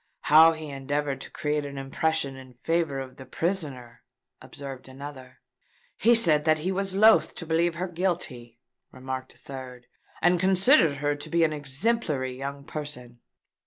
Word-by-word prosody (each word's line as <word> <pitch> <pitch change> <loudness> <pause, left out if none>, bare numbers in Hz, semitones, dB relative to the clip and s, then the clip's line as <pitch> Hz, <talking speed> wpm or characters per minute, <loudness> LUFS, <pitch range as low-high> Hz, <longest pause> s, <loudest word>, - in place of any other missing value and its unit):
"How 160 +2 +7
he 155 -1 -7
endeavoured 140 +1 -3
to - - -6
create 150 0 -2
an 140 -1 -7
impression 140 +1 -1
in 130 -1 -13
favour 165 -4 0
of 130 -1 -8
the 130 - -10
prisoner," 140 -8 -4 0.4
observed 135 -2 -9
another. 130 -1 -10 0.5
"He 235 +2 +4
said 160 -10 +4
that 155 -1 +4
he 175 +5 -2
was 190 0 -1
loath 220 +3 +5
to 165 - -4
believe 165 +1 +1
her 180 +2 -3
guilty," 165 -10 -3 0.3
remarked 130 0 -6
a - - -21
third, 130 -2 -9 0.3
"and 175 0 +3
considered 190 - +4
her 145 +1 0
to 145 +2 -8
be 170 +1 +2
an 155 -1 +2
exemplary 145 - -1
young 140 +1 -6
person." 140 -5 -7
145 Hz, 160 wpm, -26 LUFS, 135-170 Hz, 0.5 s, How